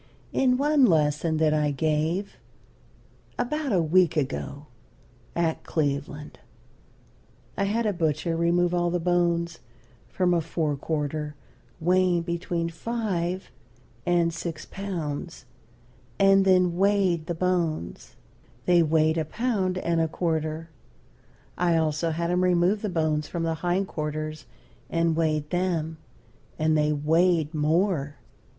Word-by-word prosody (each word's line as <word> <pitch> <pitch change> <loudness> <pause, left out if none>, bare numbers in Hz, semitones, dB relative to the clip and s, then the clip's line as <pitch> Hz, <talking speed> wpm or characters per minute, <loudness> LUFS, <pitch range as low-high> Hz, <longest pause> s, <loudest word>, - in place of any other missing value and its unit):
In 255 -1 +3
one 290 0 +4
lesson 155 -1 +2
that 155 -1 +3
I 150 -1 +2
gave, 155 +6 -1 1.0
about 290 +3 -1
a 180 -4 +3
week 165 +1 +3
ago, 140 +1 -3 0.7
at 165 -2 0
Cleveland, 145 -1 -3 1.2
I 200 - 0
had 225 +3 0
a 210 - +1
butcher 165 0 0
remove 170 +1 +2
all 175 0 +1
the 175 +1 0
bones 170 -1 0 0.5
from 180 -1 +1
a 170 - +2
fore 155 -2 -1
quarter 150 0 -3 0.4
weighing 180 0 +2
between 170 0 -2
five 185 -2 -3 0.5
and 170 0 +2
six 165 -1 -5
pounds, 170 -7 -5 0.7
and 195 0 +5
then 180 -2 +3
weighed 190 -4 +2
the 175 - -2
bones: 170 - -2 0.5
They 175 -1 +5
weighed 160 0 +2
a 155 - -1
pound 205 -7 -1
and 170 -2 0
a 160 - +2
quarter. 160 -1 -2 0.9
I 170 -2 +3
also 160 +1 0
had 170 +2 -1
him 180 +1 +2
remove 180 +3 +2
the 210 - -2
bones 155 -3 0
from 170 -1 -3
the 165 0 0
hind 180 +2 0
quarters 155 -1 -4 0.4
and 165 -1 +1
weighed 155 -2 0
them, 170 -3 -1 0.6
and 155 0 +2
they 150 0 +2
weighed 160 +2 +2
more. 155 -1 +1
170 Hz, 125 wpm, -26 LUFS, 155-180 Hz, 1.2 s, and